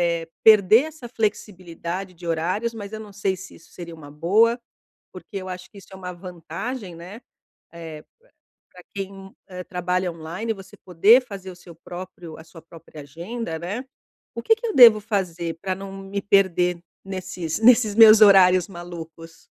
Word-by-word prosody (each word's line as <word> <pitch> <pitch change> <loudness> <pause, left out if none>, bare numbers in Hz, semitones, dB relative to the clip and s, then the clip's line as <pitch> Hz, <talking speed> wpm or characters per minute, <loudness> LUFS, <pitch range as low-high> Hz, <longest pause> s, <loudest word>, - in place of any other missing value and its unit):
eh, 165 -1 -5 0.2
perder 215 +2 +6
essa 310 -6 -10
flexibilidade 185 -4 -4
de 175 0 -13
horários, 180 +8 -2
mas 210 -2 -9
eu 215 - -5
não 215 -1 -11
sei 195 -1 -2
se 185 +1 -12
isso - - -20
seria 170 -1 -9
uma 155 -3 -12
boa, 200 +11 +2 0.6
porque - - -13
eu 185 -1 -7
acho 180 0 -8
que 205 - -17
isso - - -18
é - - -8
uma 180 -1 -7
vantagem, 180 +4 -7
né? 185 +8 -11 0.5
Eh, 160 -2 -9 0.5
p-pra 180 - -19
quem, 195 -1 -8
eh, 180 -1 -8
trabalha 180 0 -2
online, 170 +8 -5
você 195 -2 -14
poder 200 +8 +4
fazer 195 -4 -9
o - - -13
seu 175 -1 -15
próprio 175 -1 -10
a - - -12
sua 165 0 -15
própria 165 -2 -14
agenda, 165 +5 -6
né? 200 +10 -5 0.5
O - - -4
que 450 - +4
que 460 +1 -8
eu 435 - -3
devo 230 -4 +8
fazer 175 -6 -3
pra 190 -1 -2
não 195 +1 -9
me 195 +1 -6
perder 180 -3 +2 0.2
nesses 185 -3 -5
nesses 225 -2 +5
meus 220 -1 +8
horários 185 -3 +6
malucos? 165 -2 -11
185 Hz, 170 wpm, -23 LUFS, 170-210 Hz, 0.6 s, devo